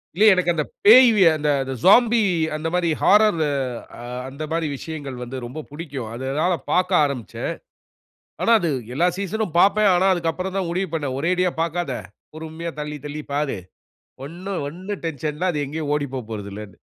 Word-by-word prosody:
இல்ல, 210 - +4
எனக்கு 185 -2 +1
அந்த - - 0 0.2
பேய்யி 250 - +8
அந்த 140 -3 0
சோம்பி, 230 +3 +6 0.3
அந்த 155 +1 -3
மாரி 180 -1 +1
ஹாரர், 210 -5 +4 0.6
அ - - -8 0.3
அந்த 140 +3 -7
மாரி 165 -1 0
விஷயங்கள் 145 -5 -7
வந்து 125 +2 -6
ரொம்ப 145 +6 -7
புடிக்கும். 145 -7 -6
அதனால 140 +8 0 0.2
பார்க்க 185 -2 +3
ஆரம்பிச்சேன். 135 -6 -4 0.9
ஆனா, 230 - +2
அது 170 - -1 0.2
எல்லா 170 +6 +2
சீசன்னும் 200 -2 -3
பார்ப்பேன். 205 +2 +5
ஆனா, 185 +2 +3
அதுக்கு 165 -2 -1
அப்புறம் 185 +3 -5
தான் 190 -3 -1
முடிவு 185 +2 -2
பண்ணேன். 145 -5 -2
ஒரேடியா 180 +3 +1
பார்க்காத. 170 +1 -2 0.4
பொறுமையா 160 +1 -6
தள்ளி, 150 0 -4
தள்ளிப் 150 0 -7
பார். 145 -2 -1 0.7
ஒண்ணும், 180 +5 -5
ஒண்ணும் 185 +5 -7
டென்ஷன் 155 -1 -3
இல்ல. 180 +4 0
அது 150 -1 -2
எங்கேயும் 150 +1 -4
ஓடிப் 145 -2 -2
போகப்போறதில்லன்னு. 105 -4 -7
165 Hz, 155 wpm, -22 LUFS, 145-185 Hz, 0.9 s, பேய்யி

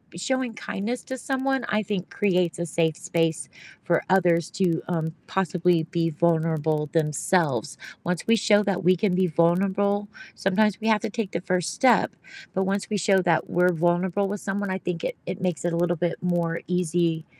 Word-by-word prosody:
showing 255 +5 -1
kindness 220 +4 -4
to 260 - -6
someone 265 -1 -1
I 215 0 +1
think 195 -2 -4
creates 180 -3 +1
a 170 - -2
safe 160 0 +1
space 165 -2 -1 0.3
for 170 -2 +1
others 175 -4 +3
to, 175 -3 +1
um, 160 -2 -2
possibly 180 -2 +1
be 165 -1 0
vulnerable 160 -2 +1
themselves. 150 - 0 0.2
Once 180 +2 -2
we 230 - +5
show 210 -2 +4
that 200 -3 -1
we 185 +2 +5
can 180 0 0
be 185 0 +3
vulnerable, 195 +5 +1 0.3
sometimes 195 +1 +1
we 220 - -3
have 215 -1 +3
to 225 - -3
take 210 -3 -3
the 170 - -3
first 180 -2 -1
step, 255 -2 +3 0.4
but 190 - 0
once 195 +2 -2
we - - +1
show 190 0 +3
that 170 -3 +1
we're 180 +1 +3
vulnerable 175 +4 +1
with 205 +1 -4
someone, 200 +1 -3
I 190 - -1
think 175 -3 -4
it - - -2
it 180 +1 -5
makes 180 -2 -2
it 170 - 0
a - - 0
little 175 0 +1
bit 175 +1 -2
more 170 -2 -1
easy 170 -2 0
180 Hz, 185 wpm, -25 LUFS, 170-200 Hz, 0.4 s, we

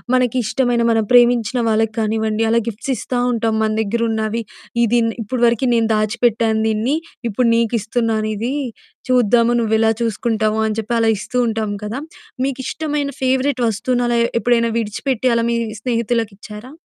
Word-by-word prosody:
మనకిష్టమైన 245 0 +1
మనం 225 -1 +2
ప్రేమించిన 240 0 +4
వాళ్ళకానివ్వండి 220 0 0
అలా 235 - +4
గిఫ్ట్స్ 230 +5 -3
ఇస్తా 250 - -3
ఉంటాం 225 -1 0
మన 215 - +1
దెగ్గరున్నవి. 220 +1 -1 0.4
ఇది 235 +1 +2
ఇన్ 230 - +1
ఇప్పడి 240 +4 -3
వరకి 235 +2 +1
నేను 230 -1 +2
దాచిపెట్టాను 220 0 +1
దీన్ని 220 +7 0 0.3
ఇప్పుడు 235 +3 +1
నీకు 230 0 +1
ఇస్తున్నాను 220 -1 -1
ఇది. 235 +6 -2 0.5
చూద్దాము 240 -1 +3
నువ్వెలా 220 0 +2
చూసుకుంటావు 220 -1 0
అని 215 -1 -1
చెప్పి 225 +2 -3
అలా 225 -1 +3
ఇస్తూ 250 +5 -5
ఉంటాం 220 -2 -2
కదా. 215 +5 -4 0.4
మీకిష్టమైన 280 +2 -2
ఫేవరెట్ 260 0 +1
వస్తువుని 245 +4 0
అలా 235 -1 +1 0.2
ఎప్పుడైనా 235 -1 +2
విడిచిపెట్టి 235 +3 -1
అలా 230 - +1
మీ 235 - +1 0.3
స్నేహితులకిచ్చారా? 230 -1 -3
230 Hz, 140 wpm, -19 LUFS, 220-245 Hz, 0.5 s, ప్రేమించిన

